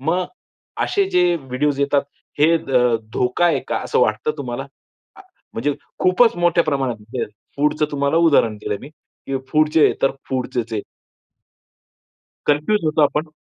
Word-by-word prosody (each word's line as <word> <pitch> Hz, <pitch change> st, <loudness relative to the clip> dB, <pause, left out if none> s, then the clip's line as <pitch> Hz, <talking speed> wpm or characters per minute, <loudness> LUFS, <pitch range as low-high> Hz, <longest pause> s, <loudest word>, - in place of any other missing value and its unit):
मग 170 Hz, +6 st, 0 dB, 0.6 s
असे 400 Hz, -, +1 dB
जे 180 Hz, -, +3 dB, 0.2 s
व्हिडिओ 135 Hz, +2 st, -1 dB
येतात 140 Hz, 0 st, +2 dB, 0.4 s
हे 160 Hz, +3 st, +5 dB
ध -, -, -10 dB, 0.4 s
धोका 125 Hz, +8 st, +1 dB
आहे 170 Hz, -, +2 dB
का -, -, 0 dB
असं -, -, +1 dB
वाटतं 460 Hz, -, +1 dB
तुम्हाला? -, -, -4 dB, 0.5 s
अ, -, -, -14 dB, 0.3 s
म्हणजे 145 Hz, +5 st, -1 dB, 0.2 s
खूपच 185 Hz, +5 st, +4 dB
मोठ्या 175 Hz, -1 st, +3 dB
प्रमाणात 125 Hz, -7 st, -2 dB, 0.3 s
फूडचं 150 Hz, +1 st, +1 dB
तुम्हाला 140 Hz, +2 st, 0 dB
उदाहरण 145 Hz, -10 st, +4 dB
दिलंय 105 Hz, -1 st, -4 dB
मी 140 Hz, -, -10 dB
की 140 Hz, -2 st, -8 dB
फूडचे, 155 Hz, 0 st, +4 dB
तर 135 Hz, -, +4 dB, 0.2 s
फूडचच 125 Hz, -3 st, -3 dB
आहे 105 Hz, -2 st, -2 dB, 1.6 s
कन्फ्यूज 150 Hz, +9 st, +2 dB
होतो 155 Hz, 0 st, +2 dB
आपण. 150 Hz, +2 st, 0 dB
150 Hz, 140 wpm, -20 LUFS, 135-165 Hz, 1.6 s, हे